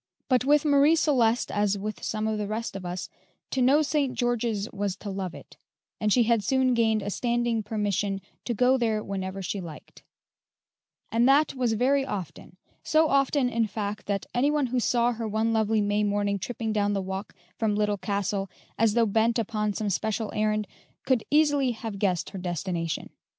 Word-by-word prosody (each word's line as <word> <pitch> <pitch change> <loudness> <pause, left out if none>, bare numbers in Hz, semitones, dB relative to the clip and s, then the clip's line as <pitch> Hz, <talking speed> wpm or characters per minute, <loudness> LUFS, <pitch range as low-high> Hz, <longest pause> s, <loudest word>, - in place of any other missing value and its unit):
But 255 -2 +3
with 295 +2 +3
Marie 290 +2 +5
Celeste, 245 -7 +2
as 205 -1 +1
with 215 +2 -5
some 215 0 -2
of 220 -1 -1
the 205 - -2
rest 220 0 -4
of 185 -2 -5
us, 180 +1 -4 0.4
to 265 - 0
know 280 +5 +5
St. 285 -3 0
George's 235 -4 0
was 200 -2 -2
to 200 +1 -7
love 190 -3 -4
it, - - -13 0.4
and 215 -1 +1
she 240 +3 +5
had 230 -2 +2
soon 260 +3 +2
gained 220 -3 +2
a 205 - -3
standing 240 0 0
permission 205 -2 -1 0.3
to 240 - -2
go 255 +4 +3
there 220 -3 0
whenever 190 0 -4
she 195 +2 -3
liked; 160 -4 -11 1.1
and 235 +3 +3
that 290 +3 +4
was 250 -4 0
very 265 +5 +2
often 190 - -6 0.2
so 315 0 +3
often, 275 -1 +2
in 230 -2 0
fact, 210 0 -5
that 200 -1 -1
any 250 +4 +2
one 295 -2 +1
who 255 0 0
saw 240 0 +2
her 230 -1 -4
one 220 +2 0
lovely 220 -1 +2
May 205 +1 +1
morning 205 -1 0
tripping 225 +2 -3
down 205 -1 +1
the 195 - 0
walk 190 +2 -6 0.2
from 215 -2 +1
the - - -1
Little 210 -1 0
Castle, 200 -1 -2 0.3
as 225 -1 +3
though 235 -1 +4
bent 225 +3 +2
upon 210 -2 -1
some 210 0 -2
special 220 +3 -2
errand, 215 0 0 0.4
could 255 -4 +2
easily 290 -4 +3
have 220 -3 -6
guessed 185 -4 0
her 195 - -6
destination. 175 -2 -3
220 Hz, 190 wpm, -27 LUFS, 200-245 Hz, 1.1 s, Marie